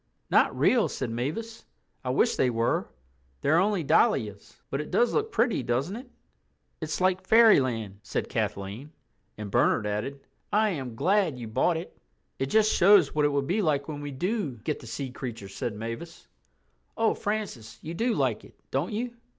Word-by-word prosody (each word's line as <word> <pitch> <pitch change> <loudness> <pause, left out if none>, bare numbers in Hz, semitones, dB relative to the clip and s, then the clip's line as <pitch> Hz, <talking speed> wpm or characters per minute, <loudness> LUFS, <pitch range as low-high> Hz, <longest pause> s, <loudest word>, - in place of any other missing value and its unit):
"Not - - +4
real," 245 -4 +4
said 130 -4 -4
Mavis. 160 - -4 0.4
"I 130 - -3
wish 225 - +2
they 130 - +2
were; 115 0 0 0.5
they're 155 +4 +4
only 195 -2 +1
dahlias. 105 -7 +1
But 135 - -1
it 150 - -8
does 240 - +2
look 445 0 0
pretty, 230 - +1
doesn't 130 - -1
it?" 250 +2 -9 0.7
"It's 155 -1 -3
like 185 0 +1
Fairyland," 130 - +4
said - - -3
Kathleen, 105 +10 -4 0.4
and 105 -2 -6
Bernard 105 - +3
added, 105 +7 -3 0.3
"I 215 0 +3
am 130 -8 -5
glad 185 - +2
you 120 -2 -6
bought 130 +10 +1
it." 170 - -8 0.4
"It 135 - 0
just 215 +7 +3
shows 190 -4 +6
what 150 -1 +2
it - - +4
will 140 -1 0
be 185 +10 0
like 145 -5 +1
when 145 -2 -5
we 145 - -5
do 180 - -2
get 150 - -2
the 120 - -12
sea 125 +3 -5
creatures," 115 -7 -7
said 115 - -3
Mavis. 115 +10 -7 0.7
"Oh, 225 -1 +3
Francis, 195 - -4
you 160 - -5
do 230 +6 0
like - - 0
it, - - -16 0.2
don't - - -1
you?" 240 +3 -3
145 Hz, 175 wpm, -27 LUFS, -, 0.7 s, shows